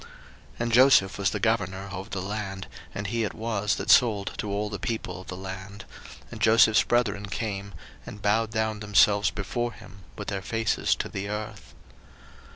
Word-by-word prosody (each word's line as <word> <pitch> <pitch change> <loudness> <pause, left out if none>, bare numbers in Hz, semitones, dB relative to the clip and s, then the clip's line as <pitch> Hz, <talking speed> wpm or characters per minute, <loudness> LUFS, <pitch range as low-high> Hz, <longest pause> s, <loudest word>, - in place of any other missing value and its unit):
01:042:006 - - -15 0.5
And 120 0 -1
Joseph 120 -6 +5
was 100 -2 +2
the - - -3
governor 100 -3 -1
over 95 +2 -6
the 95 -3 -4
land, 95 -2 -4 0.3
and 100 - -4
he 115 +3 -1
it 105 - -3
was 105 -5 -1
that - - 0
sold 105 -5 +4
to 105 - -3
all 105 +1 -1
the 105 -1 -5
people 95 -5 -4
of 95 - -15
the 90 - -6
land: 95 +2 -8 0.5
and - - -9
Joseph's 110 -1 +6
brethren 105 -4 0
came, 100 -1 -4 0.3
and 105 - -9
bowed 105 +2 +1
down 110 -1 -1
themselves 105 0 +4
before 120 +4 -3
him 100 +2 -14 0.2
with 105 - -5
their 100 -2 -3
faces 115 +3 0
to - - -3
the 100 +1 -5
earth. 105 0 -6
105 Hz, 180 wpm, -26 LUFS, 95-110 Hz, 0.5 s, Joseph's